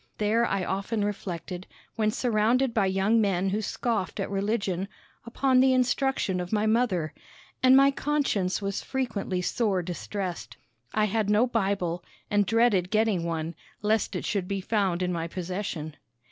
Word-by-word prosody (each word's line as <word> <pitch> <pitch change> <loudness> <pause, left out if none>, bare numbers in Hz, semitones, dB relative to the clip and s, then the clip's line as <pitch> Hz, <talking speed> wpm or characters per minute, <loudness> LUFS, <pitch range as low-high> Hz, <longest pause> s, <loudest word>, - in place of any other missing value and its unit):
There 220 +3 +2
I 195 -2 -1
often 205 +2 -1
reflected, 185 -2 -5 0.3
when 215 -1 +2
surrounded 235 +3 +1
by 205 -4 +2
young 195 +4 +2
men 195 -2 +1
who 205 +3 -1
scoffed 215 -2 -2
at 195 - -2
religion, 200 -2 -1 0.4
upon 255 +2 +2
the 260 0 +5
instruction 255 -6 +1
of 180 0 -5
my 215 -1 +1
mother, 215 -9 +1 0.5
and 260 +1 +7
my 275 +1 +6
conscience 270 -11 0
was 195 0 -2
frequently 220 -8 -2
sore 195 -3 0
distressed. 175 - -5 0.3
I 215 -1 +2
had 215 0 0
no 210 +3 +4
Bible, 195 -7 -1 0.3
and 205 -2 +3
dreaded 225 -5 +3
getting 215 -5 +1
one, 165 0 -2 0.3
lest 215 -1 +1
it 180 - -3
should 195 -4 -1
be 195 0 -2
found 190 -3 0
in 180 0 0
my 165 -1 -2
possession. 175 -3 -4
200 Hz, 155 wpm, -27 LUFS, 185-225 Hz, 0.5 s, and